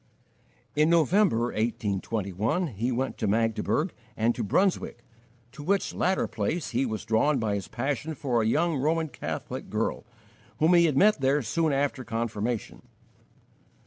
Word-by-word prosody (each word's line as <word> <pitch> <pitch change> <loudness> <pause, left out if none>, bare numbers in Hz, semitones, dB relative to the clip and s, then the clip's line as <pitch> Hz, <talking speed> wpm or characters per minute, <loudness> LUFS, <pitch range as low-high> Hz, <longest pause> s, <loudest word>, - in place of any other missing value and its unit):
In 150 +2 +4
November, 165 - +3
1821, 110 - -1
he 120 +2 -2
went 130 +2 -2
to 110 - 0
Magdeburg 115 - 0 0.2
and 115 +2 +2
to 120 - -4
Brunswick, 120 - 0 0.5
to 135 - -10
which 195 +6 0
latter 190 +1 +1
place 135 +11 -2
he 130 +2 +1
was 110 -2 -4
drawn 115 +7 +2
by 110 -4 -1
his 100 -2 -3
passion 145 +5 -3
for 125 -5 0
a 110 - +1
young 160 +6 +1
Roman 160 +3 0
Catholic - - -6
girl, - - -1 0.5
whom 160 +3 +4
he 170 -1 +6
had 150 -5 +1
met 210 -4 +4
there 135 +1 +2
soon 160 +8 0
after 140 -1 0
confirmation. 115 -1 -3
130 Hz, 145 wpm, -27 LUFS, 115-160 Hz, 0.5 s, he